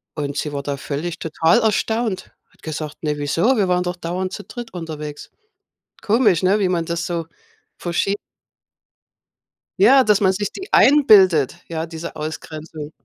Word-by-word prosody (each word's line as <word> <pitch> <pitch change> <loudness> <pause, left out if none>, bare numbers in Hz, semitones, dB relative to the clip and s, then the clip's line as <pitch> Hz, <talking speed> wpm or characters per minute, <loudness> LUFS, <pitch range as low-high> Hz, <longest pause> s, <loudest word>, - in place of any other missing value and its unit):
Und 145 -2 -3
sie 150 - -2
war 140 -1 -3
da 140 0 -2
völlig 160 +5 -4
total 165 +6 +2
erstaunt. 220 -1 -1 0.2
Hat - - -29
gesagt: 155 -1 -6
„Ne, 150 -1 -1
wieso? 165 - +1
Wir 195 -3 +1
waren 180 0 +2
doch 180 0 -3
dauernd 180 +2 -4
zu 205 - -6
dritt 240 +1 -9
unterwegs.“ 155 -4 -7 0.7
Komisch, 210 -5 +3
ne, 190 +3 +3
wie 190 - +2
man 170 -2 -1
das 170 0 -2
so 170 -2 -3 0.5
verschie 180 +3 -1 1.6
Ja, 260 +7 +7
dass 210 -5 +3
man 190 -2 +4
sich 205 +2 -3
die 385 +1 -9
einbildet, 195 - +5
ja, 165 -1 -3
diese 165 0 -8
Ausgrenzung. 155 0 -7
175 Hz, 155 wpm, -20 LUFS, 155-205 Hz, 1.6 s, Ja